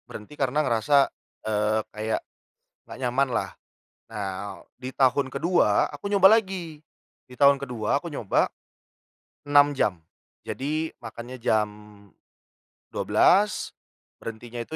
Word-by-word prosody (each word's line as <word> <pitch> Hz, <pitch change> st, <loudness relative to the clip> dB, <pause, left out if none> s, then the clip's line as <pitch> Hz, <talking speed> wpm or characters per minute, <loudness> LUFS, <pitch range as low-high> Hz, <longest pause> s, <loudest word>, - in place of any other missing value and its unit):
Berhenti 105 Hz, +7 st, -10 dB
karena 135 Hz, +2 st, +1 dB
ngerasa, 120 Hz, +4 st, +2 dB, 0.5 s
eee, 110 Hz, 0 st, +1 dB
kayak 110 Hz, +1 st, -2 dB, 0.7 s
nggak -, -, -10 dB
nyaman 135 Hz, +3 st, +1 dB
lah. -, -, -1 dB, 0.6 s
Nah, 100 Hz, -3 st, -5 dB, 0.2 s
di 130 Hz, 0 st, -6 dB
tahun 130 Hz, 0 st, +2 dB
kedua 140 Hz, -, +2 dB
aku 145 Hz, +5 st, -8 dB
nyoba 195 Hz, -2 st, +7 dB
lagi. 185 Hz, -7 st, -5 dB, 0.5 s
Di 125 Hz, -, -14 dB
tahun 140 Hz, +1 st, +5 dB
kedua 125 Hz, -2 st, -1 dB
aku 160 Hz, -, -10 dB
nyoba 110 Hz, -8 st, +1 dB, 1.0 s
6 145 Hz, 0 st, +4 dB
jam, 100 Hz, -9 st, 0 dB, 0.5 s
jadi 155 Hz, +4 st, -3 dB
makannya 120 Hz, +2 st, -8 dB
jam 110 Hz, -1 st, +2 dB, 1.2 s
12.00, 205 Hz, +2 st, +2 dB, 0.5 s
berhentinya 115 Hz, +1 st, -7 dB
itu 120 Hz, +7 st, -6 dB
130 Hz, 115 wpm, -25 LUFS, 110-145 Hz, 1.2 s, nyoba